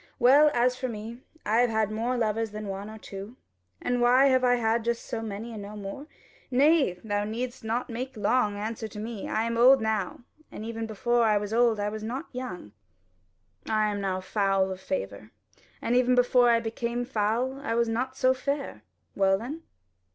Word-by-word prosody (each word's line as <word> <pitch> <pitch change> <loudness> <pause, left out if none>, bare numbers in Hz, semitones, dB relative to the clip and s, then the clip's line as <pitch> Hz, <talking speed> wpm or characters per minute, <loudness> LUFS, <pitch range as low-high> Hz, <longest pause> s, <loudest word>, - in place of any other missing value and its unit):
Well, 280 +5 +6
as 245 +1 +3
for 255 0 -3
me, 230 +1 -7 0.2
I 215 +2 +2
have 245 0 +4
had 220 -1 0
more 235 +4 -1
lovers 225 -1 0
than 210 +1 -7
one 195 +1 -5
or 220 - -9
two. 200 +2 -9 0.4
And 245 0 -1
why 255 +3 +5
have 260 -1 +3
I 245 0 +4
had 230 -1 +1
just 235 0 -2
so 225 - -4
many 225 +2 -6
and 215 - -6
no 205 +1 -8
more? 205 +8 -7 0.4
Nay, 280 - +4
thou 205 -2 -1
needest 240 +4 -4
not 230 +3 -1
make 250 +1 -5
any 210 - -7
long 210 -5 +2
answer 220 +2 -4
to 210 0 -9
me. 220 -1 -5
I 220 - 0
am 230 0 -2
old 265 +3 +7
now, 220 -4 -2 0.3
and 215 - -7
even 225 0 -4
before 240 +3 +1
I 215 -1 +4
was 205 +1 -3
old 230 -2 +3
I 205 0 0
was 215 +1 -6
not 245 +8 -4
young: 190 - -6 1.0
I 215 -1 +2
am 205 -1 -3
now 190 -1 -1
foul 195 -1 +1
of 190 0 -6
favour, 100 - -4 0.5
and 240 - +1
even 250 0 +4
before 245 0 +4
I 230 -1 +4
became 235 +1 -3
foul, 240 +3 -1
I 230 -5 -2
was 235 0 +2
not 255 +4 -2
so 255 -1 +4
fair 275 +2 -3 0.3
well 195 -1 +3
then?" 265 +10 -6
225 Hz, 200 wpm, -27 LUFS, 210-245 Hz, 1.0 s, old